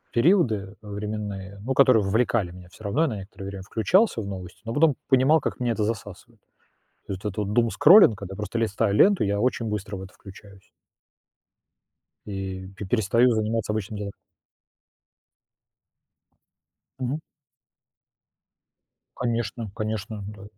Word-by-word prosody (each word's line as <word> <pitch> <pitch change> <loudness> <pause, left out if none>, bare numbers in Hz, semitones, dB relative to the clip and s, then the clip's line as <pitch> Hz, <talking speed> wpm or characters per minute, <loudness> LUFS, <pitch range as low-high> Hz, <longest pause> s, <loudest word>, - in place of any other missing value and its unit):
периоды, 155 - +4 0.3
э, 105 - -12
временные, 100 -1 -5
ну, 130 +5 -2
которые 130 -6 +5
вовлекали 105 -2 +1
меня 90 0 -12
всё 100 - -16
равно, 105 +10 0
я - - +2
на 110 -6 -3
некоторое 95 0 -9
время 100 -1 -7
включался 115 - +2
в - - -6
новости, 95 -3 -8
но 115 - -3
потом 150 0 +4
понимал, 135 +4 +4
как - - -4
меня 120 -2 0
это 110 - -1
засасывает. 110 0 -5 0.7
То - - -4
есть 95 - -6
вот 105 - -1
этот - - -17
вот 105 -1 -1
думскроллинг, 120 - +6
когда 95 -1 -7
просто 105 +3 -4
листаю 110 -2 0
ленту, 200 - +5
я 100 0 0
очень 125 -1 0
быстро 105 -1 -4
в 95 - -7
это 95 - -11
включаюсь. 95 0 -15 1.6
И 95 -2 -5
пе 100 - -6
перестаю 115 +4 +3
заниматься 110 0 -1
обычными 105 -1 -4
делами. 100 -1 -5 2.9
Мгм. 130 +5 -2 2.0
Конечно 115 -3 -2
конечно, 110 -1 -4
да. 105 -1 -10
105 Hz, 145 wpm, -25 LUFS, 100-120 Hz, 2.9 s, думскроллинг